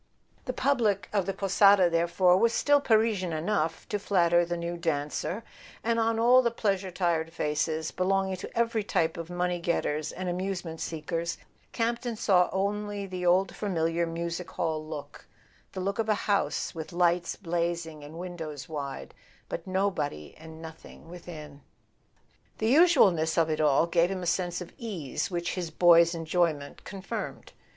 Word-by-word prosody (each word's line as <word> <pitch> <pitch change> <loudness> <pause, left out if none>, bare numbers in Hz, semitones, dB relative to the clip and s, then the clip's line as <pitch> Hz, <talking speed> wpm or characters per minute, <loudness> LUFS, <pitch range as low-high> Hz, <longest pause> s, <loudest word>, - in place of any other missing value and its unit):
The 255 - -1
public 240 -7 +1
of 200 -3 +1
the 195 - -1
"Posada," 195 -1 +5
therefore, 175 +2 +3
was 230 +5 +3
still 290 0 +3
Parisian 220 -7 +2
enough 160 -1 -1
to 205 - -1
flatter 175 -4 +3
the 175 0 -3
new 170 +1 -3
dancer; 165 +5 -2 0.4
and 230 0 +1
on 225 0 +1
all 245 +3 +6
the 240 - +1
pleasure 200 -4 -1
tired 170 -3 0
faces, 155 0 -1
belonging 190 0 0
to 185 - -8
every 230 -2 +1
type 165 -5 0
of 170 0 -7
money 175 0 -1
getters 155 -3 -1
and 185 0 -5
amusement 180 -2 -3
seekers, 165 +1 -3 0.3
Campton 235 0 -1
saw 190 -5 +3
only 205 +1 -2
the 180 -2 -3
old 185 +2 +3
familiar 170 -4 0
music 170 +1 -4
hall 155 -1 -2
look: 155 -2 -9 0.5
the - - -5
look 200 +3 -2
of 220 -1 0
a 215 - +4
house 200 -1 0
with 160 -1 -7
lights 175 0 +1
blazing 170 -3 -3
and 150 +2 -10
windows 165 -5 -6
wide, 140 -3 -6 0.4
but 170 +2 -5
no¬ 195 +1 +1
body 75 - -4
and 160 0 -12
nothing 160 0 -12
within. 155 -5 -10 1.0
The 220 +3 +2
usualness 200 - +5
of 165 -1 +3
it 155 - 0
all 150 +1 +4
gave 170 +1 +2
him 190 -1 -4
a - - -3
sense 175 +1 -1
of 180 - -9
ease 190 - -3
which 175 -2 -2
his 180 -3 -3
boy's 170 +1 +5
enjoyment 160 -3 -1
confirmed. 195 -1 -6
175 Hz, 160 wpm, -28 LUFS, 165-200 Hz, 1.0 s, all